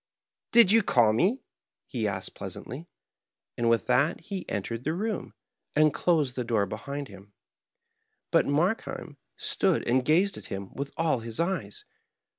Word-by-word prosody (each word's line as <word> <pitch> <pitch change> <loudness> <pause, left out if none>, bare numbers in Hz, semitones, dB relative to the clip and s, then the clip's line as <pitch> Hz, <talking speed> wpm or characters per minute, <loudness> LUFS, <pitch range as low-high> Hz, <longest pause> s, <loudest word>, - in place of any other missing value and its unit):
" - - -65
Did 230 -5 +7
you 225 +1 +6
call 120 - +4
me? 195 - +1 0.2
" - - -65
he 115 -5 -2
asked 95 -2 -4
pleasantly, 145 +9 -7 0.7
and 120 -1 +1
with 115 -1 +2
that 140 +7 +2
he 200 -3 -6
entered 115 +4 -3
the 155 +4 -1
room, 215 +2 -3 0.4
and 155 -1 +4
closed 150 -8 +1
the 125 - -1
door 115 -4 +1
behind 140 +8 -5
him. 100 -2 -14 1.0
But - - +4
Markheim 170 +10 -1 0.2
stood - - +1
and 125 +2 +3
gazed 180 +8 +3
at - - -9
him 95 0 -6
with 140 0 -4
all 160 -6 +1
his 115 -1 -5
eyes. 190 - -2
140 Hz, 160 wpm, -28 LUFS, 115-175 Hz, 1.0 s, Did